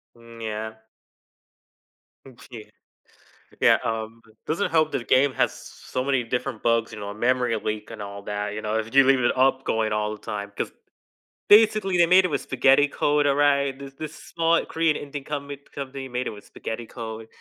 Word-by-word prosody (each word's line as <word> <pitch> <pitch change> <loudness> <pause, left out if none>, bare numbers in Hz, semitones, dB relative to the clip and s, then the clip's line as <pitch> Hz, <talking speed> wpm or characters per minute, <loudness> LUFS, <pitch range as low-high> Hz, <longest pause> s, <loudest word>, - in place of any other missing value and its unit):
Mm, 115 0 -14
yeah. 110 0 -5 1.5
Okay. 115 -3 -12 0.9
Yeah, - - +6
um, 115 0 -3 0.3
doesn't 165 +6 -1
help 155 -1 +2
that - - 0
the 120 - -8
game 130 +3 +3
has - - +1
so 130 - -6
many 135 -2 +1
different 115 -2 -3
bugs, 115 -1 +1
you 105 - -8
know, 100 0 -5
memory 120 +1 +1
leak 110 0 -4
and 110 - -8
all 100 0 -7
that, 105 0 -3
you 105 - -5
know, 110 +1 -1
if 115 +3 -5
you 135 - +8
leave 135 0 +4
it 120 - +1
up 130 +1 +3
going 110 -1 0
all 105 0 -1
the 105 - -13
time, 100 -1 -5
'cause - - -2 0.8
basically 210 -3 +5
they 170 - +6
made 185 +3 +6
it 180 - 0
with 140 -3 0
spaghetti 135 +2 +4
code, 145 0 +1
alright? 140 -1 +2
This 140 -1 -10
this 155 +1 -7
small 165 0 0
Korean 165 -2 +1
Indian 145 -1 -6
comin 140 -1 -5 0.2
company 135 -1 -6
made 125 0 -3
it - - 0
with 105 -1 -11
spaghetti 115 +1 -6
code, 110 -2 -7
125 Hz, 185 wpm, -24 LUFS, 110-145 Hz, 1.5 s, you